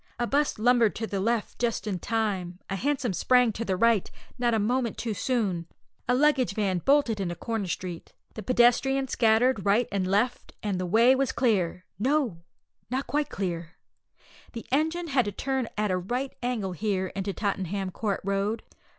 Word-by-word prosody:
A 240 - 0
'bus 285 +4 +1
lumbered 235 -1 +3
to 225 - -3
the 200 -3 -3
left 225 +2 -1
just 235 -2 -1
in 195 -4 -2
time; 195 -5 -2
a - - 0
hansom 260 -1 -1
sprang 250 +4 +3
to 220 +2 -4
the 190 -4 -1
right, 230 -2 +3 0.3
not 240 -2 +2
a - - +2
moment 235 +2 0
too 225 -2 -2
soon; 195 -5 -1 0.4
a 250 - +4
luggage 265 -6 +3
van 195 -4 0
bolted 270 - +2
into 175 -3 -2
Crown 225 -2 -3
Street; 175 -1 -5 0.2
the 220 - -6
pedestrians 255 +3 +3
scattered 225 -1 +3
right 210 +5 +3
and 195 -2 0
left, 210 +6 0
and 200 -3 -1
the 185 - -2
way 230 +7 +5
was 265 -1 +1
clear 185 -7 0
no, 255 - +1 0.5
not 260 +3 -1
quite 295 0 -1
clear! 170 -3 -4 0.8
The 230 - -7
engine 320 +5 0
had 260 -4 +2
to 205 - -2
turn 265 +3 -2
at 210 -2 +1
a 185 - +1
right 250 +9 -3
angle 240 -6 -2
here 190 0 -1
into 195 0 -2
Tottenham 195 -1 -2
Court 200 0 -2
Road. 200 +3 -1
220 Hz, 175 wpm, -27 LUFS, 195-250 Hz, 0.8 s, way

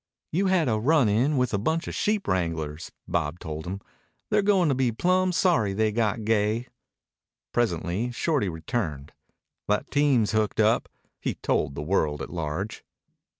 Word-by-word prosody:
"You 190 +5 +1
had 185 -5 +3
a 110 -3 +1
run 140 +1 +4
in 125 +8 +2
with 125 -2 +1
a 100 - +1
bunch 160 - -1
of - - -4
sheep 210 -1 0
wranglers," 85 -4 -2 0.2
Bob 80 -2 -1
told 80 -1 -6
him. 95 +2 -4 0.5
"They're - - +4
going 195 -4 +3
to - - +3
be 130 -2 +1
plumb 185 +9 +2
sorry 165 - +2
they 110 +2 +1
got 110 0 0
gay." 110 +2 +1 0.8
Presently 105 0 0
Shorty 135 - 0
returned. 80 - -4 0.5
"That 105 +7 0
team's 140 -7 +3
hooked 110 -1 0
up," 110 +2 +3 0.3
he - - -2
told 70 - -1
the 70 - -4
world 75 -3 0
at - - -7
large. 85 +5 -4
110 Hz, 160 wpm, -26 LUFS, 90-140 Hz, 0.8 s, run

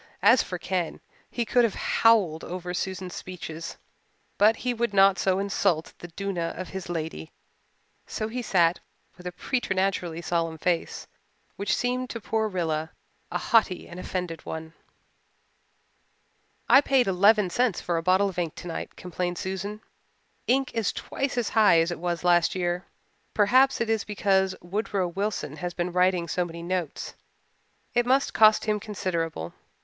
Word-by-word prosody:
As 230 +5 +7
for 180 0 -5
Ken, 175 -1 -2 0.3
he 235 - -2
could 245 +2 +3
have 225 -4 +1
howled 200 -9 +3
over 180 0 -5
Susan's 185 0 -4
speeches, 165 -3 -7 0.6
but 215 +2 +6
he 250 +2 -2
would 235 -3 -1
not 195 -1 +6
so 190 -1 +2
insult 195 -4 0
the 175 - -8
duenna 175 -1 -3
of 185 - -5
his 190 -2 -6
lady, 160 - -4 0.8
so 215 - -3
he 245 +3 -4
sat 175 -6 +2 0.4
with 180 0 -9
a - - -3
preternaturally 190 -5 -1
solemn 165 -1 -1
face 170 +1 -1 0.5
which 200 -1 0
seemed 250 +1 -1
to 230 - -5
poor 220 0 -1
Rilla 160 -4 -2 0.4
a - - -1
haughty 215 -6 +2
and 175 - -9
offended 180 -3 -4
one. 160 0 -6 1.9
"I 270 - +8
paid 270 -3 +3
eleven 200 0 +4
cents 240 -2 +1
for 170 -1 -1
a - - 0
bottle 185 +3 +3
of 180 -2 -5
ink 165 -3 -2
tonight," 175 -2 -6
complained 180 0 -4
Susan. 195 +4 -4 0.7
"Ink 265 +1 +2
is 225 -3 0
twice 275 -2 -3
as 240 -3 0
high 210 -7 +5
as 165 +2 +1
it 175 - -5
was 175 0 -2
last 175 0 +3
year. 175 0 -2 0.5
Perhaps 255 +6 +4
it 235 - 0
is 225 -2 +1
because 190 -2 +1
Woodrow 195 0 -1
Wilson 185 -5 -3
has 175 +2 -4
been 175 0 -2
writing 180 -1 +2
so 180 - 0
many 170 -1 -7
notes. 175 -3 -3 0.8
It 240 0 +2
must 270 +2 +2
cost 215 -1 +5
him 210 -1 +1
considerable. 170 - -3
185 Hz, 155 wpm, -26 LUFS, 175-215 Hz, 1.9 s, I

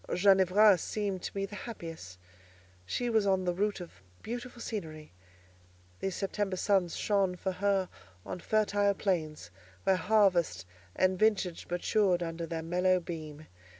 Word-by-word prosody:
Ginevra 195 +1 +5
seemed 200 0 -3
to - - -6
me 195 - 0
the 200 - -12
happiest. 165 - -8 0.7
She 245 - -1
was 220 -3 +2
on 190 -1 +2
the 175 - +1
route 205 +3 -1
of 170 - -11 0.2
beautiful 245 +1 -6
scenery; 160 - -6 0.9
these 195 -1 -2
September 195 -1 -2
suns 190 -3 +1
shone 195 -3 +1
for 190 +1 -3
her 195 0 +1 0.4
on - - -5
fertile 205 0 +1
plains, 155 - -2 0.3
where 190 - +3
harvest 180 - +2 0.3
and 185 0 +2
vintage 200 -5 +1
matured 180 0 +1
under 165 0 -4
their 165 0 -4
mellow 180 +2 +2
beam. 155 -3 -7
185 Hz, 140 wpm, -30 LUFS, 170-205 Hz, 0.9 s, Ginevra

